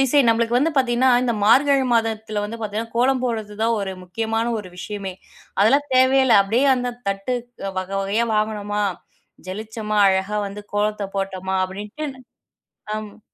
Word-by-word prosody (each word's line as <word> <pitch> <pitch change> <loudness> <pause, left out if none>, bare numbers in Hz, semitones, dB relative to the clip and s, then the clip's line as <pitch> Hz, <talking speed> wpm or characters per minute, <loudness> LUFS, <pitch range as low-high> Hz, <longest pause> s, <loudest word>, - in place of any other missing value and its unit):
Design. 270 -1 +4
நமளுக்கு 230 +1 +2
வந்து 315 +4 +1
பாத்தீங்கன்னா 255 0 +3
இந்த 240 -2 0
மார்கழி 275 +4 +5
மாதத்துல 220 -2 -1
வந்து 230 +2 -6
பாத்தீங்கன்னா 220 +2 -4
கோலம் 255 +1 +2
போடுறது 220 -4 -3
தான் 230 0 +2
ஒரு 195 -1 -3
முக்கியமான 225 +5 -2
ஒரு 185 -3 -8
விஷயமே. 195 -1 -5 0.5
அதெல்லாம் 280 +8 +4
தேவையே 260 +1 +5
இல்ல. 230 -4 +6
அப்டியே 230 +8 +1
அந்தத் 245 -1 -4
தட்டு 195 +6 -2 0.4
வக 185 0 -4
வகையா 205 +4 0
வாங்குனோமா? 210 -1 -1 0.6
ஜலிச்சமா 215 +2 -4
அழகா 190 +2 0
வந்து 200 +1 -7
கோலத்தப் 205 -1 -1
போட்டமா 190 -1 -2
அப்டின்ட்டு 205 +10 -7 0.9
ஆமா. 215 -1 -7
220 Hz, 145 wpm, -22 LUFS, 205-245 Hz, 0.9 s, இல்ல